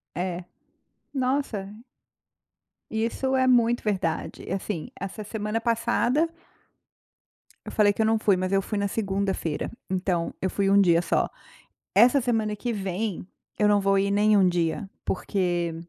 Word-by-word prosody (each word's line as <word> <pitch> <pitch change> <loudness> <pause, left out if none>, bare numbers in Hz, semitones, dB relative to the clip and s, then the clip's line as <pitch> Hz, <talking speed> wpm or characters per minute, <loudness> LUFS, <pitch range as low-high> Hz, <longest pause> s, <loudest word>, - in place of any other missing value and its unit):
É, 175 0 -3 0.7
nossa. 255 -7 -1 1.2
E 220 0 0
isso 265 +3 -1
é 260 - +3
muito 240 -2 +3
verdade 185 -6 -2
assim, 190 -4 -4
essa 195 +2 -5
semana 210 +1 -3
passada 235 +6 +1 1.4
eu - - -7
falei 205 -1 +4
que 220 - -1
eu - - +3
não 225 0 +3
fui 200 -3 +3
mas 185 +1 -2
eu 195 - +4
fui 210 +2 -3
na 200 0 0
segunda-feira, 195 -6 -2 0.2
então 180 -2 -1
eu 190 - -1
fui 195 -1 0
1 200 +1 +6
dia 170 -3 +5
só, - - +1 0.7
Essa 250 +4 +6
semana 225 -4 0
que 240 +3 -3
vem 195 -1 -3 0.3
eu 210 -1 +4
não 205 -1 +4
vou 195 0 +2
ir 200 +1 +1
nenhum 205 -2 +4
dia, 175 +2 -1 0.2
porque 175 -3 -1
200 Hz, 145 wpm, -26 LUFS, 185-225 Hz, 1.4 s, 1